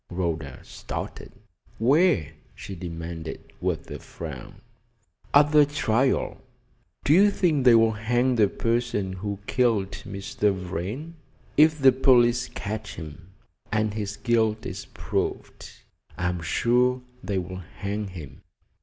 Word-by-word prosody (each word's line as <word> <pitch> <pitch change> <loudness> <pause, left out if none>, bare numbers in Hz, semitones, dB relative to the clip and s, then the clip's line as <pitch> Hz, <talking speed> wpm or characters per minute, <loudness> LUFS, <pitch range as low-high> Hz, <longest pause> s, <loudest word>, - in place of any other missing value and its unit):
Rhoda 85 -6 -3
started. - - -7 0.5
"Where?" 135 - +3 0.2
she 100 - -8
demanded, 85 -2 -7
with - - -2
a - - -5
frown. - - -8 0.8
"At 145 +1 +5
the 150 -1 +7
trial." 135 -3 0 0.6
"Do 145 - +4
you 200 +5 +7
think 160 -9 +1
they'll 115 -2 +6
hang 120 +4 +1
the 110 -4 +4
person 115 -3 -1
who 100 +2 -4
killed 110 -7 +1
Mr. 100 +1 -2
Vrain?" 95 - -5 0.4
"If 155 +1 +5
the 135 -2 +6
police 125 -2 +4
catch 105 +1 -5
him, 80 0 -9 0.4
and 110 -1 +1
his 105 -1 -4
guilt 110 -2 +1
is - - -5
proved, - - -4 0.5
I 90 +1 0
am 90 -1 -3
sure 125 +8 +2 0.2
they 95 +1 -2
will 90 0 -4 0.2
hang 100 +1 -3
him." 85 -8 -10
110 Hz, 125 wpm, -25 LUFS, 95-125 Hz, 0.8 s, the